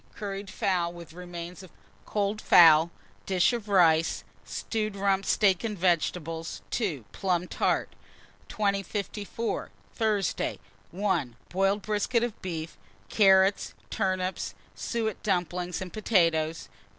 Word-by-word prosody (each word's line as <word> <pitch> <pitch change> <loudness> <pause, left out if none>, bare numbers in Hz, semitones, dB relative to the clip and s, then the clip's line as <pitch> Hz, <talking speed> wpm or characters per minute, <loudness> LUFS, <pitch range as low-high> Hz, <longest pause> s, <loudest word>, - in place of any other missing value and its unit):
Curried 200 -2 -5
fowl 180 -5 0
with 170 -2 -11
remains 175 +1 -8
of 185 - -12 0.4
cold 210 +1 -1
fowl; 160 -1 +7 0.4
dish 190 +4 +3
of 225 -3 -4
rice, 165 -4 +4 0.2
stewed 215 -2 -3
rump 195 0 +1
steak 195 -3 +3
and 215 -3 -3
vegetables. 165 -2 -1
2. 165 - -2
Plum 180 -2 -1
tart. - - 0 0.6
2054. 205 +2 -2 0.2
Thursday. 215 -5 0 0.3
1. 180 - -1
Boiled 195 +2 +1
brisket 220 +3 +1
of 240 -3 -4
beef, 165 -3 -5 0.3
carrots, 195 -1 +4 0.2
turnips, 185 -3 -1 0.2
suet 220 -4 -3
dumplings, 180 -2 -1
and 180 - -10
potatoes. 165 -7 +1
190 Hz, 110 wpm, -28 LUFS, 170-205 Hz, 0.6 s, fowl